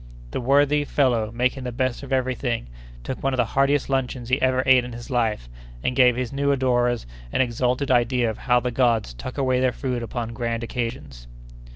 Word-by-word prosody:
The - - -3
worthy 145 +3 +3
fellow, 125 -7 +1
making 125 +3 -1
the 125 - -4
best 130 +1 -1
of 140 -1 -9
every 130 -1 +1
thing, 120 - -2 0.4
took 130 - -5
one 135 0 0
of - - -1
the 125 - +3
heartiest 140 +3 +1
luncheons 130 -3 -2
he 130 +2 +1
ever 130 0 +2
ate 130 -1 +6
in 125 0 -7
his 120 +3 -9
life, 110 - 0 0.4
and 125 - 0
gave 125 -2 +5
his 125 0 -3
new 140 +1 +1
adorers 120 - +1 0.3
an - - +2
exalted 125 +2 0
idea 120 0 +2
of 110 - -4
how 125 -1 +3
the 125 0 -2
gods 115 - +1
tuck 125 - -8
away 130 -2 +1
their 130 -1 +2
food 125 -2 -3
upon 115 0 -4
grand 115 0 -2
occasions. 115 - -5
125 Hz, 205 wpm, -23 LUFS, 120-130 Hz, 0.4 s, ate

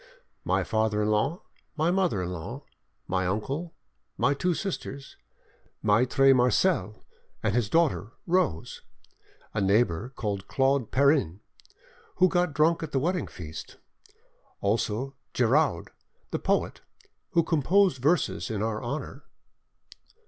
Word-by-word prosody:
"My - - +1
father 110 -1 0
in 105 - 0
law, 135 - 0 0.3
my 160 +3 +2
mother 180 - +1
in 90 - -4
law, 80 -3 -6 0.4
my 95 -1 0
uncle, 140 - -3 0.4
my 140 - +3
two 175 +5 0
sisters, 140 -8 -5 0.7
Maitre 125 +5 +4
Marcel 125 - +1 0.4
and 105 - +1
his 115 -3 +1
daughter 145 - +1
Rose; 175 - 0 0.7
a 105 - -1
neighbour 100 +1 +2
called 100 -3 -3
Claude 135 -2 +1
Perrin, 135 - +2 0.7
who 185 - +5
got 175 -5 0
drunk 165 +2 +3
at 160 -2 -6
the 135 - +2
wedding 175 +4 -1
feast; 80 -3 -9 0.8
also 110 +5 -1 0.2
Giraud, 125 - +2 0.4
the - - -1
poet, - - 0 0.5
who 170 - +4
composed 165 -1 +2
verses 155 -1 +1
in 110 -2 -2
our 110 -1 -2
honour." 140 +6 -5
130 Hz, 120 wpm, -27 LUFS, 105-160 Hz, 0.8 s, who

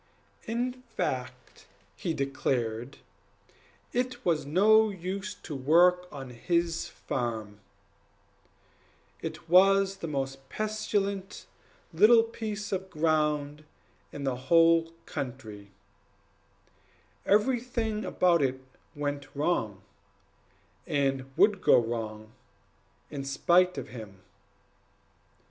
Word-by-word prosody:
In 245 +3 -2 0.2
fact, - - -4 0.3
he 170 -5 -3
declared 125 -3 -2 1.0
it 250 0 -2
was 165 -4 +1
of - - -11
no 215 +7 +5
use 195 +2 -5
to 155 - -8
work 175 +6 +4
on 135 -3 -8
his 170 +6 -1
farm; 110 -5 -4 1.6
it - - -6
was 195 +2 +5
the 170 - -5
most 135 -2 -4
pestilent 205 -2 -2 0.5
little 220 +7 +6
piece 215 -2 -5
of 190 -1 -3
ground 150 -2 0 0.5
in 140 - -7
the 135 -2 0
whole 165 -1 +5
country; 110 -6 -7 1.5
everything 225 0 +1
about 175 -3 +2
it 130 -1 0 0.4
went 145 -1 -3
wrong, 115 - -1 1.0
and 135 -2 0
would 205 -2 +4
go - - +6
wrong, 110 -2 -3 0.8
in 140 -2 -5
spite 175 +6 +3
of - - -5
him. 105 -5 -10
165 Hz, 95 wpm, -28 LUFS, 135-195 Hz, 1.6 s, little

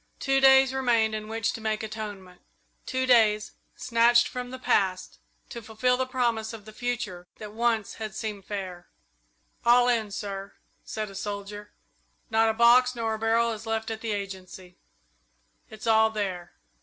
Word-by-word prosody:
Two 270 0 +2
days 265 0 +6
remained 235 -4 +2
in 215 0 -4
which 225 0 -1
to 225 - -7
make 220 0 -2
atonement 205 -4 -7 0.5
two 260 -1 -1
days, 215 -4 +4 0.2
snatched 240 0 +3
from 250 0 -6
the 260 - -7
past, 190 -7 0 0.3
to 235 - -7
fulfil 225 +3 0
the 260 0 -1
promise 235 -4 -1
of 215 -3 -10
the 215 - -10
future 215 -7 -4
that 210 -1 -9
once 230 -2 0
had 215 -1 -5
seemed 210 -3 -5
so - - -30
fair. 185 -4 -6 0.8
"All 245 +1 +5
in, 230 -4 +1
sir," 200 -1 -6 0.3
said 215 -2 -5
a - - -12
soldier. 205 +1 -6 0.6
"Not 225 0 +4
a - - +1
box 245 +2 +5
nor 225 -1 -1
a 220 - -4
barrel 230 +1 +2
is 225 0 -7
left 225 0 -2
at 220 0 -5
the 225 - -3
Agency. 190 -2 -7 0.9
It's 215 0 -10
all 220 -1 +4
there." 190 -5 -4
220 Hz, 170 wpm, -27 LUFS, 205-235 Hz, 0.9 s, days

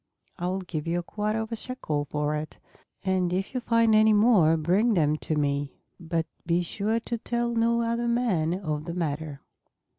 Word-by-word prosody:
I 175 - -1
will 190 +1 -1
give 165 -4 -5
you 170 +1 0
a 175 - -2
quarter 215 +4 -2
of 220 +1 -6
a - - -1
shekel 185 - -3
for 150 +1 -1
it; 150 +1 -5 0.5
and 185 -2 +1
if 190 +5 -2
you 255 - 0
find 230 -1 +3
any 215 0 +6
more 205 -7 +5
bring 195 +9 +2
them 155 -3 +3
to 155 - -2
me. 145 -1 -1 0.2
But 165 -1 -2 0.2
be 170 +1 +1
sure 210 +6 -1
to 235 0 -3
tell 235 +1 -1
no 235 0 +2
other 235 +1 -1
man 205 -9 +1
of 155 -5 -3
the 170 0 -5
matter." 150 -4 -3
180 Hz, 190 wpm, -27 LUFS, 155-225 Hz, 0.5 s, any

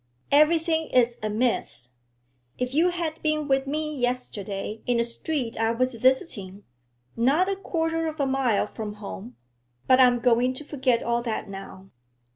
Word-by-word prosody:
'Everything 320 +2 +3
is 240 -1 +2
amiss. 215 - -1 0.7
If 250 +1 -2
you 330 +5 +4
had 335 -3 -3
been 305 -1 0
with 270 -1 +1
me 305 +1 -2
yesterday 220 -5 -3
in 245 -1 +2
a - - +3
street 235 0 -3
I 225 0 +2
was 255 +2 0
visiting, 225 - 0 0.5
not 280 +10 +3
a 395 - 0
quarter 330 -4 -1
of 315 0 -5
a 280 - +2
mile 265 -5 +1
from 215 -2 -6
home 125 - -8 0.5
But 260 0 +5
I'm 250 -1 +6
going 245 +1 +2
to 300 - -7
forget 260 -5 0
all 235 0 0
that 230 -2 -3
now. 195 -1 -10
255 Hz, 155 wpm, -25 LUFS, 225-305 Hz, 0.7 s, I'm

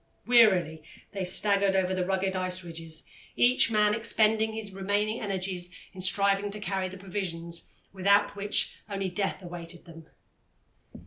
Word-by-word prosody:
Wearily 190 -10 +4 0.3
they 195 -2 -4
staggered 200 +1 +3
over 190 -1 +1
the 185 -1 -1
rugged 190 0 0
ice 185 0 -3
ridges, 165 -2 -5 0.3
each 245 -1 +4
man 210 -1 +3
expending 220 0 +1
his 220 -2 -4
remaining 205 +3 -1
energies 185 -3 -3 0.2
in 185 - -7
striving 200 +2 +4
to 210 +1 -5
carry 190 -1 -2
the 190 - -10
provisions, 175 -3 -5
without 200 +2 +3
which 205 +1 -1
only 195 -1 -2
death 195 +1 -3
awaited 175 0 -8
them. 165 -2 -13
195 Hz, 140 wpm, -28 LUFS, 180-205 Hz, 0.3 s, Wearily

